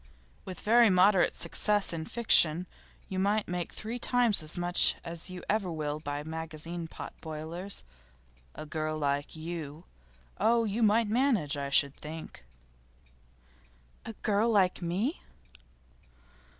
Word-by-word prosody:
With 185 -3 -7
very 230 +1 +5
moderate 185 0 +4
success 205 +3 0
in 160 -1 -4
fiction 180 -7 +4 0.4
you 190 - -3
might 205 +2 +1
make 175 -1 -3
three 230 +3 -5
times 240 -5 +3
as 155 +2 -5
much 175 0 +3
as 170 +1 -5
you 185 -1 -8
ever 200 -4 0
will 150 -2 -3
by 145 -1 -4
magazine 160 +1 -5
pot - - -8
boilers. 160 - -4 0.7
A - - -7
girl 155 0 -3
like 145 0 -1
you. 160 -1 -7 0.5
Oh, 230 +1 +3
you 220 +1 -2
might 220 +1 +4
manage, 220 - +2
I 140 -1 -3
should 140 0 +3
think.' 155 - -9 1.6
'A 225 - -7
girl 215 +2 +2
like 190 -5 +2
me? 195 - -2
175 Hz, 130 wpm, -30 LUFS, 155-210 Hz, 1.6 s, very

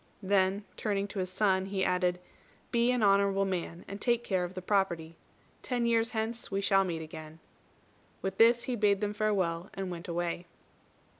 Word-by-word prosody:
Then, 195 +1 +2
turning 200 -2 -1
to 200 - -5
his 185 -1 -2
son, 190 -1 +1
he 195 -1 -1
added, 180 -1 +1 0.5
"Be 235 +1 +3
an 250 -3 +2
honourable 195 -1 +4
man, 175 -2 -4
and 200 +1 -7
take 240 -1 +2
care 185 -5 0
of 180 +1 -5
the 185 - -4
property. 170 -5 0 0.5
Ten 245 -3 -1
years 230 0 +2
hence 225 +1 -3
we 195 - -1
shall 195 -1 +3
meet 165 -3 -3
again." 155 0 -9 0.9
With 190 0 -3
this 235 +1 +6
he 250 - -2
bade 205 -3 +3
them 210 0 -1
farewell, 195 -5 0
and 190 -1 -4
went 170 0 -6
away. 175 0 -2
195 Hz, 175 wpm, -30 LUFS, 180-215 Hz, 0.9 s, this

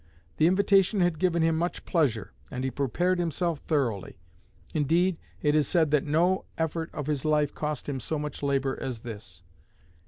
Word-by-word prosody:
The 160 - +5
invitation 195 +1 +3
had 175 -3 +1
given 170 -3 +2
him 165 0 +3
much 170 +2 -2
pleasure, 120 - 0 0.2
and 130 - -4
he 130 - -1
prepared 175 +8 0
himself 170 -1 -1
thoroughly; 125 - -1 0.6
indeed, 165 +4 +2 0.2
it 150 -1 +3
is 150 -1 +3
said 160 -5 +2
that 150 -2 +3
no 175 +5 +2
effort 160 0 -2
of 150 - -5
his 145 -3 -1
life 150 -2 +2
cost 150 -2 -3
him 140 -2 -2
so 155 +5 -3
much 150 -1 -5
labor 135 -1 0
as 125 -4 -4
this. 105 -8 -8
150 Hz, 175 wpm, -27 LUFS, 135-170 Hz, 0.6 s, The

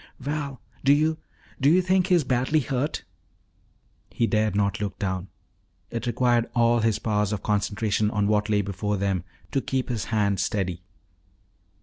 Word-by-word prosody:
"Val, 140 -1 -3 0.2
do 135 - +5
you 155 +2 +2 0.4
do 140 - +5
you 175 +4 +5
think 185 0 +2
he 185 - +4
is 170 - +3
badly 130 +4 +1
hurt?" 135 +3 -2 1.1
He 115 - 0
dared 110 -2 +1
not 100 0 0
look 100 -2 -3
down; 95 -2 -2 0.6
it 115 +1 -3
required 120 0 +2
all 120 0 +4
his 110 -1 +2
powers 105 -2 0
of 105 -3 -3
concentration 105 0 0
on 105 -2 0
what 105 0 +1
lay 105 -1 +2
before 105 +1 -2
them 95 -2 0 0.3
to 135 - +1
keep 130 0 -2
his 115 -4 -2
hand 100 -3 +1
steady. 90 -4 -1
110 Hz, 160 wpm, -25 LUFS, 105-130 Hz, 1.1 s, do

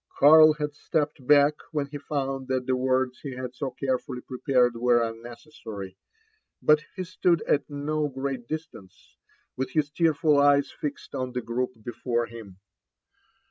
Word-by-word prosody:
Karl 155 +1 +8
bad 150 -1 -3
stepped 150 -3 -2
back 145 0 +6 0.2
when 150 -3 -1
be 145 +1 -8
Tound 135 -2 -3
thai 130 - +1
the 130 - +1
words 130 0 0
he 140 -4 -7
had 125 -1 -6
so 135 +1 -3
carefully 130 -1 -3
prepared 125 -2 +1
were 120 0 +3
unnecessary; 115 -4 -9 0.6
but 150 0 +4
he 185 - -3
stood 175 -2 +1
at 145 - +1
do 150 +1 -2
great 135 -2 -4
distance, 155 - -8 0.4
with 130 0 -3
his 150 -2 0
tearful 155 -1 +2
^;es 140 0 +4
fixed 145 -1 -6
on 130 -2 -3
the 125 - -2
group 125 +2 -2
before 120 0 -2
him. 110 -5 -11
135 Hz, 150 wpm, -26 LUFS, 125-150 Hz, 0.6 s, Karl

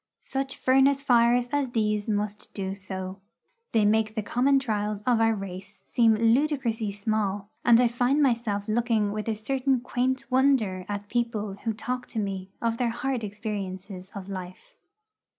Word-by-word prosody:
Such 270 0 -3
furnace 270 +1 +3
fires 240 -1 +4
as 285 -3 0
these 210 -1 0
must 210 0 -2
do 190 -1 -3
so. 190 0 -6 0.5
They 220 -2 +3
make 215 +1 +2
the 215 - -1
common 265 +6 +3
trials 210 -5 -1
of 240 -1 +2
our 225 0 +3
race 195 0 -8
seem 225 -2 +4
ludicrously 230 -2 +1
small, 205 -1 -2
and 235 -1 +6
I 245 - +5
find 245 +4 +1
myself 230 -7 +1
looking 220 -2 +1
with 215 +1 -4
a 225 - 0
certain 260 +4 0
quaint 255 +2 -1
wonder 255 -9 +2
at 205 0 -4
people 230 -3 -1
who 225 - +2
talk 250 +3 -4
to 225 - -4
me 195 -2 -3
of 230 0 0
their 245 -2 +2
hard 245 +1 -2
experiences 195 -3 -5
of 195 -1 -7
life. 190 - -8
220 Hz, 160 wpm, -27 LUFS, 205-245 Hz, 0.5 s, and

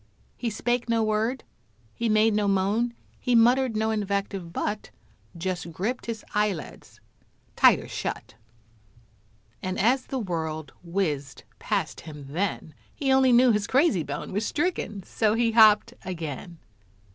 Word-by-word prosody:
He 240 - -2
spake 240 +2 -1
no 230 -1 +2
word 220 +4 0 0.5
he 235 -1 -1
made 215 +1 +4
no 210 -1 +1
moan 205 +5 +1 0.2
He 250 - +1
muttered 240 0 +4
no 220 +1 +1
invective 200 -4 -2
but 210 +4 -3 0.5
Just 175 -1 -3
gripped 215 +11 -3
his 225 -2 -5
eyelids 210 -6 -3 0.6
tighter - - +5
shut, - - -5 1.3
And 185 0 -3
as 250 +5 +2
the 270 - -3
world 160 - -4
whizzed 155 -7 -2 0.2
past - - -2
him 150 -3 -10
then, 170 0 -2 0.2
He 270 -2 0
only 265 -1 +5
knew 245 +1 +6
his 210 -2 0
crazy 265 - +3
bone 160 - -5
Was 205 +3 0
stricken 290 - -2
so 215 +2 +1
he 230 0 +2
hopped 220 0 +6
again. 170 -2 -6
210 Hz, 135 wpm, -26 LUFS, 185-235 Hz, 1.3 s, knew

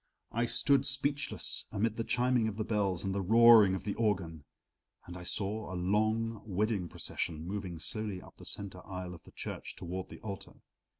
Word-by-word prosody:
I 115 +1 +1
stood 135 +3 +3
speechless 140 0 0
amid 110 +2 0
the 115 - -1
chiming 125 -1 +2
of 110 -2 -4
the 110 - 0
bells 100 -5 0
and 95 -1 -1
the 100 - 0
roaring 110 -1 +7
of - - -5
the 100 - -2
organ, 90 -9 -1 0.6
and 90 - -8
I 90 - -7
saw 100 +3 -2
a - - -4
long 110 +4 +1
wedding 100 -2 0
procession 80 +1 -3
moving 95 -2 -4
slowly 110 -1 -2
up - - -15
the - - -12
center 95 -3 -5
aisle 90 -2 -6
of 85 - -11
the - - -14
church - - -6
toward 90 +2 -5
the - - -10
altar. 100 -4 -6
105 Hz, 185 wpm, -32 LUFS, 90-115 Hz, 0.6 s, roaring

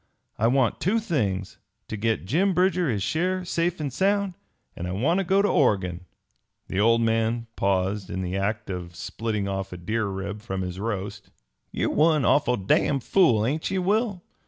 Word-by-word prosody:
I 115 - +3
want 130 -1 +2
two 200 +6 +2
things 105 - -2 0.3
to - - -4
get 110 -1 -1
Jim 180 - +2
Bridger 180 -3 +2
his 105 -5 -1
share 185 - 0
safe 170 0 -1
and 145 -4 -3
sound; 200 +1 +1 0.4
and 90 - -5
I - - -3
want 150 - +1
to - - +1
go 195 +2 +3
to - - +3
Oregon." 95 - +1 0.6
The 95 - -1
old 115 +2 +4
man 115 +1 +1
paused 95 0 0
in 95 - -3
the 90 +1 -3
act 105 +1 -2
of 90 -1 -6
splitting 105 -2 -3
off 95 0 -3
a 90 - -6
deer 110 +5 -1
rib 100 +2 -5
from 95 -4 -3
his 90 0 -5
roast. 100 -2 -4 0.4
"Ye're - - -1
one 155 -2 +3
awful 125 -4 +3
damn 105 +8 +2
fool, 120 - +3
ain't 150 +6 -1
ye, 190 - -1
Will? 200 0 0
115 Hz, 180 wpm, -25 LUFS, -, 0.6 s, old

